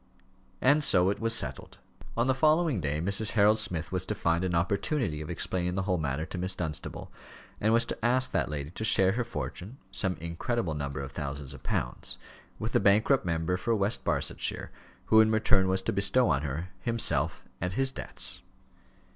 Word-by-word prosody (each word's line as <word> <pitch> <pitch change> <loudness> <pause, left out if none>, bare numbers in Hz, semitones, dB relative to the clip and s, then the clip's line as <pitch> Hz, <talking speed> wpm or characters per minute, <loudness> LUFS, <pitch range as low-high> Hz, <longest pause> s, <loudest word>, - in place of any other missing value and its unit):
And 145 +4 +4
so 95 -6 +5
it - - -4
was 115 0 0
settled. 65 - -3 0.4
On 115 - +2
the 130 - +3
following 155 - +2
day 75 0 -1
Mrs. 100 +5 +2
Harold 105 +1 +4
Smith 90 -7 -2
was 95 -1 0
to 105 - -2
find 85 -2 0
an 90 -2 -1
opportunity 100 - -1
of 75 - -7
explaining 90 +1 -2
the 95 - -1
whole 90 -3 0
matter 75 +1 -2
to 90 - -6
Miss 95 +1 0
Dunstable, 80 -4 -5 0.5
and 110 - +2
was 115 +1 +4
to - - -6
ask 130 +2 +3
that - - 0
lady 75 0 -5
to 110 - -6
share 95 -3 +4
her 120 +4 -1
fortune 90 - -6
some 95 -1 0
incredible 85 +4 -3
number 70 -2 -4
of 70 0 -7
thousands 70 -1 -6
of 70 - -11
pounds - - -3 0.4
with - - -4
the - - +3
bankrupt 110 +6 +3
member 85 +2 0
for 115 +5 0
West 100 +1 0
Barsetshire, - - -2 0.3
who 110 0 +6
in 110 - +4
return 110 -3 +3
was 95 0 0
to - - -1
bestow 100 +6 +3
on 70 -2 +1
her 75 +5 -4
himself 115 +1 0 0.2
and 90 +1 -2
his 135 +4 +1
debts. - - -2
95 Hz, 190 wpm, -29 LUFS, 80-115 Hz, 0.5 s, who